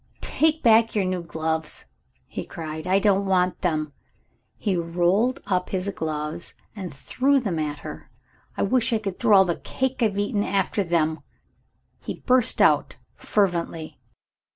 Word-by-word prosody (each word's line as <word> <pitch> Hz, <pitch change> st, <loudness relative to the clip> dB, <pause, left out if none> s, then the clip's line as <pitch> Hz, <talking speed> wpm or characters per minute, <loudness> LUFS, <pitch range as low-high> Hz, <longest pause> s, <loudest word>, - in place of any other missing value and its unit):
"Take 315 Hz, 0 st, +1 dB
back 225 Hz, -1 st, +5 dB
your 200 Hz, -3 st, +2 dB
new 185 Hz, -1 st, -1 dB
gloves," 160 Hz, -1 st, -3 dB, 0.4 s
he -, -, -6 dB
cried, 155 Hz, +1 st, -7 dB
"I 190 Hz, +1 st, +4 dB
don't 200 Hz, -1 st, +2 dB
want 180 Hz, -1 st, +1 dB
them!" 155 Hz, -4 st, -1 dB, 0.6 s
He 200 Hz, -4 st, -1 dB
rolled 175 Hz, +9 st, +1 dB
up 185 Hz, -2 st, 0 dB
his 190 Hz, 0 st, -2 dB
gloves, 155 Hz, -2 st, -4 dB, 0.2 s
and 190 Hz, -5 st, -6 dB
threw 270 Hz, -, +1 dB
them 195 Hz, -10 st, -2 dB
at 150 Hz, -1 st, -3 dB
her. 75 Hz, 0 st, -8 dB, 0.5 s
"I -, -, +1 dB
wish 250 Hz, +4 st, +2 dB
I -, -, +3 dB
could 200 Hz, -4 st, -5 dB
throw 215 Hz, -4 st, +5 dB
all 190 Hz, -, +6 dB
the 170 Hz, -2 st, -1 dB
cake 265 Hz, 0 st, -3 dB
I've 210 Hz, -4 st, +1 dB
eaten 205 Hz, 0 st, 0 dB
after 195 Hz, +1 st, 0 dB
them!" 165 Hz, -2 st, +1 dB, 0.8 s
he -, -, -7 dB
burst 250 Hz, -1 st, +4 dB
out -, -, +3 dB, 0.2 s
fervently. 170 Hz, -5 st, -1 dB
185 Hz, 150 wpm, -24 LUFS, 165-210 Hz, 0.8 s, all